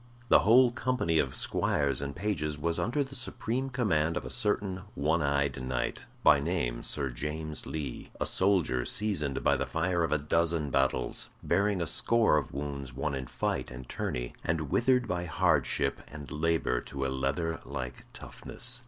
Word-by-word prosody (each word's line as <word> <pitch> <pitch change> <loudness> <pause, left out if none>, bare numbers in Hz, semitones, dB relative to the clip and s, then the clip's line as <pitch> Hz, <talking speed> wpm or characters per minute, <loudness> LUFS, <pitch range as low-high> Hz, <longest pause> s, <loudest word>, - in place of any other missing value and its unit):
The - - +8
whole 120 +4 +6
company 120 -10 +1
of 65 -3 0
squires 70 -3 0
and 70 -1 -4
pages 75 -8 -2
was 85 +3 -1
under 135 +6 +1
the 135 0 -10
supreme 130 0 -2
command 90 - +1
of - - -4
a - - -6
certain 105 -5 0
one 80 +4 +1
eyed 70 -3 0
knight, 65 -1 -3 0.2
by 75 - +7
name 70 -6 -1
Sir 70 -3 -2
James 75 +4 -3
Lee; 75 -5 -5
a - - 0
soldier 90 -10 +2
seasoned 75 - 0
by - - +4
the - - -2
fire 85 +1 0
of 80 - -1
a 75 - +4
dozen 80 0 0
battles, 65 -2 0
bearing 100 -2 +2
a - - -2
score 115 +1 +3
of 75 - -2
wounds 70 -3 -5
won 70 +2 -1
in 65 -2 -4
fight - - -2
and 65 0 -9
tourney, - - -3
and 80 -3 -1
withered 125 0 +3
by 90 -1 -2
hardship 80 - +1
and 75 -1 -9
labor 80 -4 +1
to 70 -1 -4
a - - 0
leather 70 +5 -1
like 65 -1 -6
toughness. 120 - -3
75 Hz, 170 wpm, -30 LUFS, 70-95 Hz, 0.2 s, The